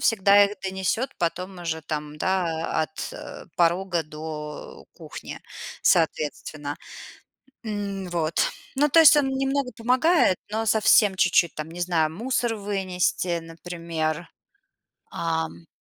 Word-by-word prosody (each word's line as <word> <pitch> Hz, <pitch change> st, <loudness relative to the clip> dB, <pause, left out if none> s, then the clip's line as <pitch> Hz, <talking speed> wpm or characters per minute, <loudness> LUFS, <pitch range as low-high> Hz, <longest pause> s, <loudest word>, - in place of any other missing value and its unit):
всегда 205 Hz, -2 st, +5 dB
их 200 Hz, 0 st, -3 dB
донесёт 190 Hz, +7 st, -1 dB
потом 180 Hz, +2 st, -2 dB
уже 160 Hz, -2 st, -3 dB
там, 150 Hz, 0 st, -5 dB
да, 170 Hz, -4 st, 0 dB
от 155 Hz, 0 st, -6 dB, 0.4 s
порога 175 Hz, 0 st, +2 dB
до 150 Hz, 0 st, -8 dB
кухни, -, -, -9 dB, 0.4 s
соответственно. 150 Hz, -2 st, 0 dB, 0.9 s
М, 200 Hz, -3 st, -4 dB
вот. 165 Hz, -2 st, -1 dB, 0.4 s
Ну, 295 Hz, +2 st, +3 dB
то 330 Hz, -, +6 dB
есть 320 Hz, -1 st, +9 dB
он 280 Hz, -2 st, +3 dB
немного 270 Hz, 0 st, -1 dB
помогает, 255 Hz, -, +3 dB
но 225 Hz, +1 st, -1 dB
совсем 210 Hz, -1 st, +5 dB
чуть-чуть 170 Hz, -3 st, +3 dB
там, 155 Hz, +1 st, -5 dB
не 175 Hz, +2 st, -7 dB
знаю, 165 Hz, -3 st, +1 dB
мусор 240 Hz, +4 st, -1 dB
вынести, 185 Hz, -3 st, -1 dB
например. 165 Hz, -1 st, -4 dB, 0.8 s
Ам. 165 Hz, 0 st, -3 dB
180 Hz, 115 wpm, -25 LUFS, 160-210 Hz, 0.9 s, есть